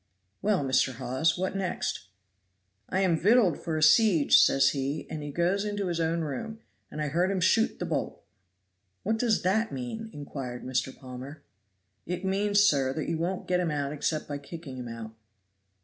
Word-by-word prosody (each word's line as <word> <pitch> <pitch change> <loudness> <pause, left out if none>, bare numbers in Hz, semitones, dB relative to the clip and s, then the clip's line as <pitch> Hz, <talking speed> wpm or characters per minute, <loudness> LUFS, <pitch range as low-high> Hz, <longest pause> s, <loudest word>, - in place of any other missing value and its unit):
"Well, 195 -7 +1
Mr. 130 0 +2
Hawes 130 +8 0
what 185 +1 -2
next?" 185 - -3 0.8
"'I 190 - 0
am 175 -4 +2
victualed 205 - +4
for 160 -2 -3
a 155 - +1
siege,' 165 -1 +6
says 135 - +5
he, 140 +2 -3
and 155 - -4
he 145 0 -5
goes 175 +6 +1
into 205 -1 -2
his 170 -1 -2
own 165 +1 0
room, 220 - -5 0.3
and 155 - -7
I 150 -1 -1
heard 175 +5 +1
him 195 -1 0
shoot 225 +6 +2
the - - -3
bolt." - - -3 0.8
"What 220 +2 0
does 230 -3 +1
that 220 +5 +1
mean?" 135 - -5
inquired 135 -4 -6
Mr. 130 +1 -2
Palmer. 130 +3 -9 0.6
"It 180 +2 -3
means, 205 +2 +2
sir, 140 -9 +3
that 155 - -3
you 165 -1 -1
won't 180 +3 -2
get 180 0 +2
him 175 -2 0
out 145 -1 -2
except 150 +1 -2
by 145 -1 -4
kicking 140 -2 -9
him 125 -1 -6
out." 115 -1 -7
160 Hz, 180 wpm, -28 LUFS, 140-190 Hz, 0.8 s, siege